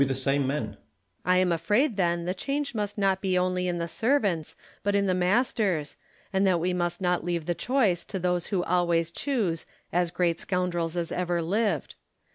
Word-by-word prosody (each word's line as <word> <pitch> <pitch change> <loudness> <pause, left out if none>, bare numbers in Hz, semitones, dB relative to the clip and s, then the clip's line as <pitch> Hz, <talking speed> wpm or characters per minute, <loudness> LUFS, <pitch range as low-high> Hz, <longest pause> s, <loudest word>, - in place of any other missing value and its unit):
Lacy, 135 -3 0 0.5
I 180 0 +4
am 185 -1 +3
afraid 210 - +2
then 170 -3 +1
the 180 - 0
change 275 +8 -2
must 210 -2 -3
not 195 -2 +2
be 185 -2 +1
only 180 0 +1
in 175 -1 -1
the 170 0 -2
servants, 205 - 0 0.3
but 205 0 0
in 200 0 +3
the 185 - +2
masters, 185 - +1 0.4
and 190 +1 +3
that 180 -2 +3
we 180 +2 0
must 175 0 -1
not 180 -2 +1
leave 170 -2 -2
the 175 - 0
choice 210 -6 +1
to - - -4
those 180 -1 0
who 190 -4 0
always 170 -2 +1
choose 200 - -1
" - - -37
as 175 0 +2
great 170 -1 0
scoundrels 175 -2 -1
as 170 -1 -2
ever 175 -1 0
lived." 205 +6 0
180 Hz, 185 wpm, -27 LUFS, 170-195 Hz, 0.5 s, I